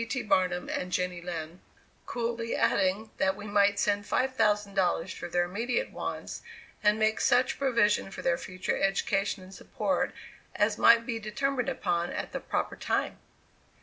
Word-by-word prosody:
T. 255 - -1
Barnum" 185 -3 +1
and 180 0 -3
"Jenny 180 -1 -1
Lind," 170 -1 -6 0.5
coolly 230 -1 -2
adding 200 +3 +1
that 190 0 +2
we 205 - -9
might 205 -1 +3
send 205 0 +1
$5,000 205 -8 +1
for - - -6
their 175 0 +1
immediate 235 - -2
wants, - - -5 0.4
and 210 0 +4
make 220 0 +1
such 250 +1 +3
provision 235 -8 +2
for - - -8
their 170 - +1
future 185 0 -3
education 195 0 0
and 185 +1 -13
support - - -1 0.4
as 210 0 +1
might 230 0 +6
be 230 -2 -3
determined 245 +4 -1
upon 175 -2 -1
at - - -4
the - - -3
proper - - -2
time! - - -1
205 Hz, 150 wpm, -29 LUFS, 185-230 Hz, 0.5 s, might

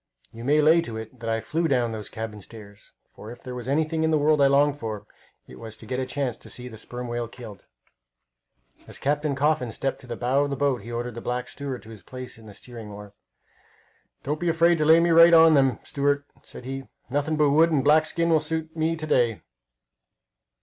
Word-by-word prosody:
You 115 +1 -9
may 150 +4 +3
lay 160 +3 +5
to 115 -7 -6
it 110 +3 -9
that 115 -1 -4
I 115 0 0
flew 165 +6 -1
down 125 -5 +1
those 110 -2 -6
cabin 110 -2 -6
stairs, 100 -1 -13 0.2
for 105 - -11
if 120 - -13
there 125 - -7
was 125 -1 -6
anything 160 +3 0
in 160 - +2
the 155 - +3
world 150 0 +3
I 140 - +6
longed 145 +1 +3
for, 110 -2 -5 0.4
it - - -13
was 110 -1 -9
to - - -13
get 130 0 -3
a 130 - -2
chance 135 -5 -2
to - - -14
see 125 - -7
a 125 -3 -9
sperm 120 +3 -7
whale 120 0 -3
killed. 115 -4 -12 1.2
As - - -10
Captain 145 0 -1
Coffin 145 -4 +1
stepped 135 +4 -3
to 130 - -14
the 120 - -4
bow 130 +4 +1
of 145 - -2
the 140 - -2
boat 135 -4 0
he 115 +4 -9
ordered 120 +1 -4
the 115 - -7
black 125 +1 -3
steward 140 -3 -6
to 110 - -12
his 110 -3 -11
place 130 0 -9
at 110 - -15
the 105 - -11
steering 115 -2 -9
oar. 105 0 -10 1.1
"Don't 150 +3 -2
be 175 - 0
afraid 165 0 +3
to 155 - +2
lay 160 +2 +7
me 170 0 +2
right 165 +1 +8
on 165 0 +8
to - - +4
them, 135 -5 +3
steward," 145 0 0 0.2
said - - -12
he. 135 +1 -5 0.3
"Nothing 145 +3 0
but 150 -2 +3
wood 160 +3 +5
and 150 -5 +1
black 155 +2 +4
skin 170 +1 0
will 160 - +5
suit 160 +1 -4
me 160 +1 0
to 160 -1 -6
day!" 120 - +1
135 Hz, 235 wpm, -25 LUFS, 115-155 Hz, 1.2 s, right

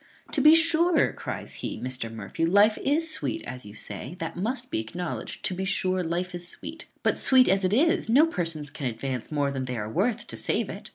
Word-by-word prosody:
"To - - +2
be 305 +1 +8
sure," 330 +1 +3
cries - - -6
he, - - -4
"Mr. 125 -3 -3
Murphy, 110 +7 -5
life 205 +5 +5
is 320 +4 +1
sweet, 330 - -2
as 125 -4 -7
you 105 - -11
say, 165 - -6
that 165 -2 -5
must 245 +7 -2
be - - 0
acknowledged; 170 +11 -5
to - - +2
be 185 +1 -3
sure, 185 -1 0
life 175 +2 -2
is 175 0 -3
sweet; - - -7 0.2
but, - - +2
sweet 260 -1 +5
as 190 +1 +3
it 185 - +2
is, 330 - +3
no 275 +7 +6
persons 165 - -3
can 135 - -3
advance 125 +2 -4
more 145 -2 +1
than 135 -1 -3
they 125 -1 -4
are 105 -1 -3
worth 220 - 0
to - - -5
save - - 0
it. - - -9
180 Hz, 220 wpm, -27 LUFS, -, 0.2 s, be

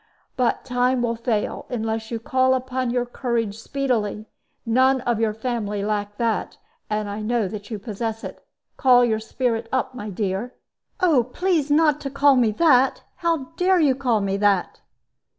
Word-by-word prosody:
But 250 -2 0
time 250 0 +1
will 235 -1 0
fail, 225 -2 -2
unless 225 -2 -3
you 230 - -2
call 260 +3 +2
upon 255 -1 -2
your 245 0 0
courage 235 -4 -2
speedily. 225 -5 -2 0.4
None 260 +3 +3
of 240 -3 0
your 220 -2 0
family 215 -4 -3
lack 205 -1 -2
that; 230 -2 -1 0.3
and 210 0 -1
I 205 +1 -5
know 225 -1 0
that 205 +1 -8
you 220 - -4
possess 220 +2 -4
it. - - -8 0.3
Call 250 -2 +5
your 220 -2 0
spirit 225 0 -2
up, 260 0 -1
my 215 -4 -6
dear." 200 +4 -3 0.5
"Oh, 315 -9 +4
please 320 +2 0
not 300 0 +3
to 275 - -4
call 275 0 +4
me 240 -3 +3
that! 265 -2 +3
How 330 -6 -1
dare 370 0 +3
you 290 -5 +4
call 245 -5 0
me 195 0 -1
that?" 200 -3 +1
240 Hz, 170 wpm, -23 LUFS, 215-260 Hz, 0.5 s, Call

